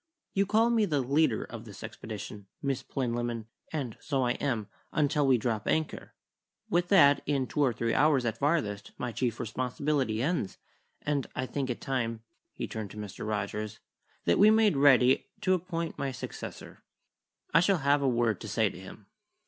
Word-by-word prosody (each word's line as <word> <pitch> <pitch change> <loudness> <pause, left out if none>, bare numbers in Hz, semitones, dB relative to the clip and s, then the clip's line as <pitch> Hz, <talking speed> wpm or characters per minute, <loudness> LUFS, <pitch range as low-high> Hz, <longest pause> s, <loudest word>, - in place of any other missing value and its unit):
"You 195 0 +2
call 225 +3 +3
me 225 -3 +3
the 150 -7 0
leader 135 -1 +2
of - - -8
this - - -10
expedition, 105 -2 -7
Miss 135 -2 -1
Plinlimmon; 120 -3 -2 0.3
and 135 -8 -4
so 135 -3 0
I 120 - +2
am, 120 -5 -1 0.3
until 145 -1 +2
we 130 -2 +5
drop 110 -2 -2
anchor. 160 -1 -1 0.6
With 175 +1 +2
that, 145 -7 +6
in 140 -2 +1
two 150 - -5
or 135 -3 +4
three 115 0 -1
hours 145 -5 +3
at 115 -1 -2
farthest, 130 -10 0
my 125 - -3
chief 120 -1 -1
responsibility 125 0 -1
ends, 155 - -1 0.5
and 145 -3 0
I 130 - -1
think 130 +1 -3
it 125 - -3
time" 115 -4 -2 0.3
he - - -5
turned 110 -2 -5
to 105 - -11
Mr. 105 0 -6
Rogers 105 0 -3 0.5
"that 85 - +3
we 210 - +8
made 220 -4 +4
ready 135 -2 +5
to 185 - +3
appoint 170 -2 -3
my 140 -1 -1
successor. - - -8 0.7
I 165 - +7
shall 185 +2 +3
have 140 -1 +2
a 140 - +2
word 115 -4 +1
to - - -6
say - - +1
to - - -11
him." - - -11
130 Hz, 180 wpm, -29 LUFS, 115-150 Hz, 0.7 s, we